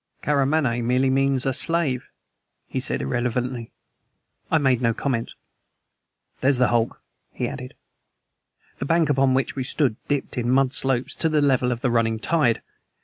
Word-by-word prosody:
"Karamaneh 140 -4 +1
merely 130 +3 +2
means 135 0 +2
a 135 - +1
slave," 150 -4 0 0.6
he - - -4
said - - -2
irrelevantly. 120 - -2 0.8
I 160 - +3
made 130 -5 +2
no 115 -2 +1
comment. 120 -5 -2 1.1
"There's 135 0 +2
the 125 0 +3
hulk," 120 -1 0 0.3
he - - -3
added. 65 - -7 1.0
The - - -3
bank 165 0 +2
upon 135 -1 +3
which 135 - -1
we 135 - -2
stood 130 -3 0
dipped 140 -3 -2
in 120 0 -1
mud 135 0 +3
slopes 135 -2 +1
to 160 - +1
the 155 -1 +2
level 130 -3 +2
of 120 -1 -3
the 125 - +1
running 115 -1 +1
tide. 125 -1 +1
130 Hz, 155 wpm, -23 LUFS, 120-140 Hz, 1.1 s, I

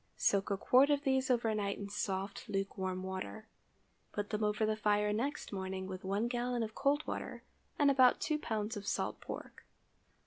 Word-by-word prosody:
Soak 200 0 +2
a 200 - +1
quart 260 +7 +5
of 290 -1 +2
these 265 -1 +2
over 235 -3 +2
night 200 -2 -1
in 200 - -5
soft 195 0 -3
lukewarm 190 -2 -2
water; 190 +3 -5 0.7
put 205 0 -3
them 210 0 0
over 210 +1 +2
the 215 0 +1
fire 210 -1 +2
next 260 +2 -2
morning, 190 -1 -3
with 185 0 -6
one 200 +4 0
gallon 240 0 -1
of 220 -1 -5
cold 285 +4 +1
water - - -5 0.3
and 285 -1 +5
about 260 -2 +6
two 305 -1 0
pounds 220 -3 -2
of 205 -1 -6
salt - - -1
pork. - - -8
210 Hz, 180 wpm, -34 LUFS, 195-250 Hz, 0.7 s, about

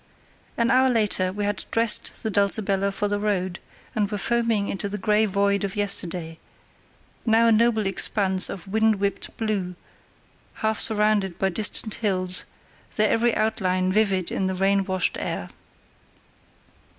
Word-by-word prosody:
An 235 +2 +2
hour 260 0 +4
later 210 -6 +1
we 205 +2 -3
had 205 -1 -3
dressed 230 -1 0
the 220 - -2
Dulcibella 200 -1 +1
for 205 +1 -2
the 205 0 -1
road, 190 -4 -1 0.3
and 210 -2 0
were 210 - -3
foaming 230 -1 0
into 200 +1 -3
the 205 - -4
grey 210 +2 +2
void 200 +1 +1
of 200 +1 -3
yesterday, 180 -5 -2 0.8
now 225 0 +3
a 230 - +5
noble 220 -1 +3
expanse 195 0 0
of 185 -3 -7
wind 220 +2 +2
whipped 200 0 -3
blue, 205 -6 -2 0.9
half 220 -1 +1
surrounded 210 -4 +1
by 195 - +1
distant 215 +2 0
hills, 185 -4 0 0.5
their 215 0 +2
every 235 0 +2
outline 185 -4 0
vivid 195 -3 +1
in 190 - -1
the 190 - -2
rain 195 +1 +1
washed 185 -2 0
air. - - -4
205 Hz, 150 wpm, -24 LUFS, 190-220 Hz, 0.9 s, a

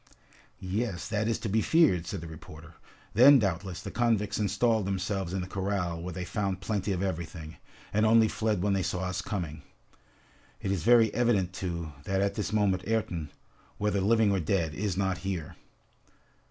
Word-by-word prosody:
"Yes, 95 -1 -3
that 110 0 0
is 115 - +1
to - - -5
be 110 +2 +2
feared!" 100 - +3
said 100 - -4
the 85 - -7
reporter. 80 +1 -11 0.4
"Then, 135 +6 +8
doubtless, 95 -4 -2
the - - -6
convicts 115 -4 +1
installed 105 +1 +1
themselves 95 -1 -2
in 95 0 -2
the 90 - -5
corral 95 -3 -2
where 90 +1 -5
they 90 +1 -5
found 95 -1 -2
plenty 100 0 -2
of 95 0 -1
everything, 80 -3 -5 0.4
and 105 +1 +2
only 110 0 +5
fled 105 -4 -1
when 100 -1 +2
they 95 - +1
saw 90 +1 -2
us 90 0 -2
coming. 85 -7 -4 1.0
It 95 - -2
is 95 -4 -1
very 115 +2 +5
evident, 105 -7 +1
too, 85 -4 -4
that 95 0 0
at 100 0 +1
this 105 -1 -3
moment 100 -4 +2
Ayrton, 90 -9 -2 0.5
whether 105 -1 0
living 110 +1 +3
or 95 - +1
dead, 85 -2 0
is 95 +2 -2
not 95 -2 0
here!" 90 -5 -4
95 Hz, 180 wpm, -29 LUFS, 90-105 Hz, 1.0 s, Then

